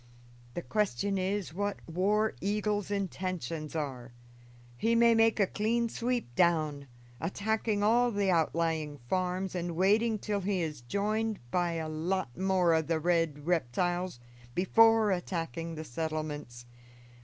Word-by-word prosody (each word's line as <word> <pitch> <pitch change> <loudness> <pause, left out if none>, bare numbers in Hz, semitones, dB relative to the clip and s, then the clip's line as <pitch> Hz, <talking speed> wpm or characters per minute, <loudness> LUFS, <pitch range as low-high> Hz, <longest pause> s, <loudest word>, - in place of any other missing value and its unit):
The 175 - -3
question 200 - 0
is 190 -2 -2
what 205 +2 -2
War 205 +6 +1
Eagle's 205 0 -1
intentions 180 -6 -3
are. 130 -5 -4 0.6
He 230 - +1
may 235 0 +6
make 225 0 +3
a 200 - +5
clean 230 +4 0
sweep 240 - -2
down, 155 -4 +1 0.3
attacking 205 +4 -1
all 240 +3 +4
the 200 -4 +1
outlying 160 -2 0
farms 185 +3 -1
and 175 -2 -3
waiting 215 +5 +3
till 205 0 -2
he 195 0 0
is 150 -6 -4
joined 210 - -1
by 175 -1 +1
a 160 -1 -3
lot 155 -3 -2
more 185 -2 +2
of 160 -1 +1
the 165 -1 +1
red 165 -3 0
reptiles 175 +1 0 0.4
before 225 +3 +5
attacking 165 -3 -3
the 155 - -5
settlements. 150 -4 -4
180 Hz, 130 wpm, -30 LUFS, 160-205 Hz, 0.6 s, may